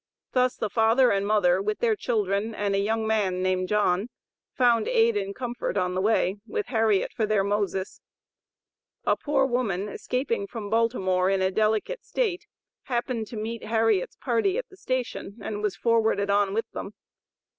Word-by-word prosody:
Thus 255 0 +2
the 215 - -3
father 230 +3 +4
and 200 0 0
mother, 190 -4 +3
with 210 +1 -1
their 455 -2 +2
children 215 - -1
and 205 -1 -1
a 195 - +2
young 220 +2 0
man 200 -4 0
named 185 0 0
John, 210 0 +1 0.4
found 240 -3 +3
aid 225 0 +3
and 200 -1 -2
comfort 245 -4 -3
on 180 -1 0
their 185 - 0
way, 205 -2 +2
with 435 -2 -2
Harriet 220 -5 +2
for 220 - 0
their 210 -2 +2
"Moses." 200 -1 -2 1.0
A - - +3
poor 280 -2 +1
woman 225 -7 -1
escaping 290 - -2
from 220 - -7
Baltimore 190 -5 +2
in 195 -1 +1
a 190 - +2
delicate 220 - 0
state, 410 -8 -2 0.4
happened 240 -3 -2
to 230 - -8
meet 225 +2 -4
Harriet's 220 -4 +1
party 260 - 0
at - - -4
the 380 - -15
station, 255 - -4
and 205 0 -5
was 210 -3 -1
forwarded 220 -1 +2
on 200 -1 +2
with 225 - 0
them. - - -7
215 Hz, 170 wpm, -26 LUFS, 200-240 Hz, 1.0 s, father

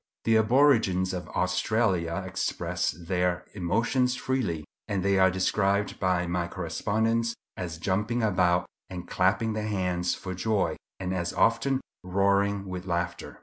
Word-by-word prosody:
The 115 - +3
aborigines 110 -6 +4
of 90 -1 -4
Australia 90 -1 0
express 90 -2 -1
their 90 +2 -1
emotions 115 +7 +1
freely, 110 - -2 0.2
and 95 -3 -1
they 100 0 +3
are 95 0 +6
described 100 +2 0
by 90 -1 +1
my 85 0 -1
correspondents 110 +7 -1 0.2
as 85 -3 -5
jumping 105 +7 0
about 90 -4 +2 0.2
and 90 -1 -7
clapping 110 +5 +1
their 110 0 -2
hands 90 -3 0
for 95 - -6
joy, 105 +2 0 0.2
and 95 -1 -2
as 85 -2 -2
often 130 +4 +2 0.2
roaring 100 +2 +1
with 95 0 -6
laughter. 85 0 -3
95 Hz, 135 wpm, -27 LUFS, 90-110 Hz, 0.2 s, are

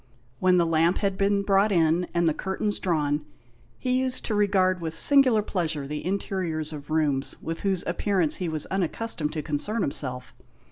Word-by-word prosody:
When 185 -1 +4
the 170 - +3
lamp 165 +2 +2
had 200 -2 0
been 200 +1 +1
brought 200 +1 +3
in, 170 0 +2
and 170 -1 +1
the 160 - +2
curtains 190 +4 -2
drawn, 150 -4 0 0.5
he 255 0 0
used 260 -1 -1
to 220 - -2
regard 190 -3 +2
with 160 -1 -3
singular 255 - +5
pleasure 160 -8 -2
the 150 +2 -5
interiors 180 -5 -3
of 145 0 -9
rooms 150 -3 0
with 165 0 -5
whose 190 -3 -1
appearance 175 -1 0
he 180 -3 -3
was 155 -2 -3
unaccustomed 185 -3 -2
to 155 -2 -4
concern 200 +9 -2
himself. 125 -2 -3
175 Hz, 175 wpm, -25 LUFS, 155-200 Hz, 0.5 s, singular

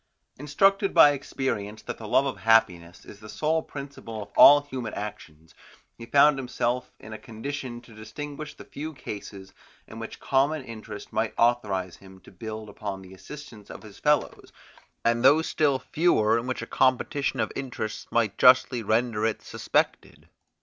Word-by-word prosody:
Instructed 195 +8 +2
by 150 -3 +8
experience 130 -7 -4
that - - -7
the 110 - -8
love 135 - +3
of 135 - -3
happiness 90 -6 +2
is 105 - -13
the 110 0 -12
sole 160 +5 0
principle 140 -8 -8
of 100 - -16
all 145 +1 +9
human 130 -6 -6
actions, 85 -7 -8 0.4
he 115 - -11
found 140 +2 +5
himself 125 -1 -2
in 110 - -10
a 110 - -8
condition 120 +1 -6
to 120 -1 -17
distinguish 145 +8 -8
the - - -12
few 155 +2 -7
cases, 100 -5 -9 0.3
in - - -11
which - - -8
common 140 +2 +1
interest 110 -3 -9
might 110 0 -1
authorize 105 -7 +1
him 95 -1 -16
to - - -16
build 110 +2 -7
upon 100 -2 -6
the 95 0 -13
assistance 110 +2 -12
of - - -10
his 105 -2 -13
fellows, 150 0 0 0.5
and 115 +1 +2
those 150 +5 +5
still 145 -3 +1
fewer, 115 -8 +2
in 120 - -6
which 125 -2 -3
a - - -5
competition 130 +3 0
of - - -1
interests 125 -5 -5
might 115 -4 0
justly 125 -1 +5
render 110 0 0
it 110 -1 -1
suspected. - - -2
115 Hz, 165 wpm, -26 LUFS, 105-140 Hz, 0.5 s, all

